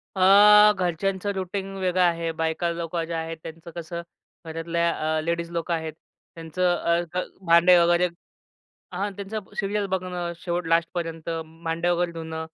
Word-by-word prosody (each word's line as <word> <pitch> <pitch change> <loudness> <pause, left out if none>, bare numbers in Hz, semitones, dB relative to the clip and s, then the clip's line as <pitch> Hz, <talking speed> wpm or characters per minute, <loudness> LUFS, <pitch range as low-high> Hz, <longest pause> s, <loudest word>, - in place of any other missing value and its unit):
अ, 210 +2 +8
घरच्यांचं 190 +3 -1
रूटीन 190 +1 -4
वेगळं 185 -1 +1
आहे. 170 -2 +2
बायका 160 +1 -1
लोकं 170 0 -3
ज्या 165 0 -4
आहेत, 165 0 -5
त्यांचं 165 +1 -9
कसं, 170 0 -5 0.4
घरातल्या 170 +1 -1 0.3
अ, - - +1
लेडीज 170 +1 -2
लोकं 170 0 -2
आहेत 160 -1 -3 0.4
त्यांचं 175 +2 0
अ, 170 0 +1 0.5
भांडे 170 +2 +7
वगैरे 175 +1 +4 0.9
हां, 200 +3 -2
त्यांचा 200 +2 -5 0.2
सीरियल 205 0 -1
बघणं, 180 -2 -3
शेवट 175 -1 -3
लास्टपर्यंत 165 -1 -1 0.3
भांड्या 165 +2 0
वगैरे 175 0 0
धुणं 160 -1 -6
170 Hz, 140 wpm, -25 LUFS, 165-185 Hz, 0.9 s, अ